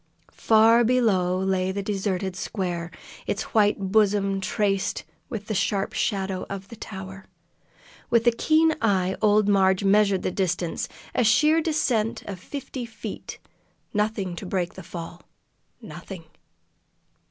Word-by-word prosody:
Far 225 +2 +5
below 210 -7 +2
lay 190 0 0
the 200 +1 -3
deserted 195 -2 -2
square, 175 -4 -3 0.4
its - - -1
white 210 -2 +4
bosom 200 -2 +2
traced 195 0 -1 0.3
with 210 -3 -5
the 215 - -3
sharp 200 0 0
shadow 190 -3 -1
of 195 0 -6
the 230 - -9
tower. 190 -2 -9 0.8
With 235 0 +3
a 240 - +6
keen 315 +6 +3
eye 190 -4 +1
old 210 -1 +4
Marg 190 -1 +3
measured 200 -1 +3
the - - -1
distance, 175 -3 -2 0.2
a - - +2
sheer 300 +9 +4
descent 250 -9 0
of 195 -3 -7
fifty 270 +3 -6
feet. 225 -1 -8 0.6
Nothing 210 -4 -1
to 195 - -6
break 180 -2 -2
the 190 - -9
fall 170 0 -8 0.6
nothing! - - -9
200 Hz, 130 wpm, -25 LUFS, 190-220 Hz, 0.8 s, a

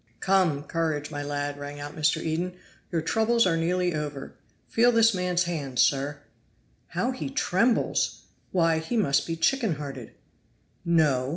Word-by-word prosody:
"Come, 185 -7 +2
courage, 155 -2 -2
my 145 -2 -4
lad," 145 0 -3
rang 145 0 -7
out 145 +1 -7
Mr. 150 -1 +1
Eden, 170 +3 -2 0.4
"your 165 -3 -1
troubles 225 +5 +2
are 175 -3 +2
nearly 175 +2 0
over. 145 -3 -5 0.3
Feel 240 +2 +4
this 230 -1 +5
man's 180 -1 +1
hand, 150 -7 -4
sir." 140 +2 +2 0.7
"How 250 - -1
he 260 +1 -5
trembles! 235 -4 +1 0.3
Why, 165 -3 +2
he 195 +9 -3
must 140 -11 +2
be 165 - -2
chicken 215 - +1
hearted." 135 -5 -7 0.7
"No! 150 -7 +2
165 Hz, 150 wpm, -26 LUFS, 145-185 Hz, 0.7 s, this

